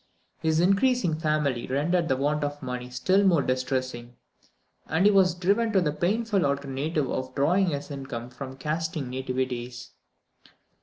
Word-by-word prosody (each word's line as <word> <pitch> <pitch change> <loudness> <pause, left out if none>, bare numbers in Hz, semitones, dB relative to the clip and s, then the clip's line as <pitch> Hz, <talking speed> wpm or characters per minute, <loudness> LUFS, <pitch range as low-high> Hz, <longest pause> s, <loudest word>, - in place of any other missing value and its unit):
His 160 0 +1
increasing 195 -2 +2
family 150 -6 0
rendered 165 +6 +1
the 130 - +1
want 145 +2 0
of 145 0 -4
money 125 0 -4
still 155 +11 +2
more 170 -7 +4
distressing, 130 -2 -2 0.7
and 165 +5 +1
he 210 - +7
was 190 -3 +4
driven 200 +6 +1
to 195 - +5
the 160 -5 +1
painful 200 +5 0
alternative 140 +1 -1
of 130 0 -4
drawing 180 +8 +3
his 145 -3 -3
income 135 -4 -6
from 130 +1 -8
casting 155 -1 -3
nativities. 125 -1 -4
145 Hz, 145 wpm, -26 LUFS, 130-175 Hz, 0.7 s, he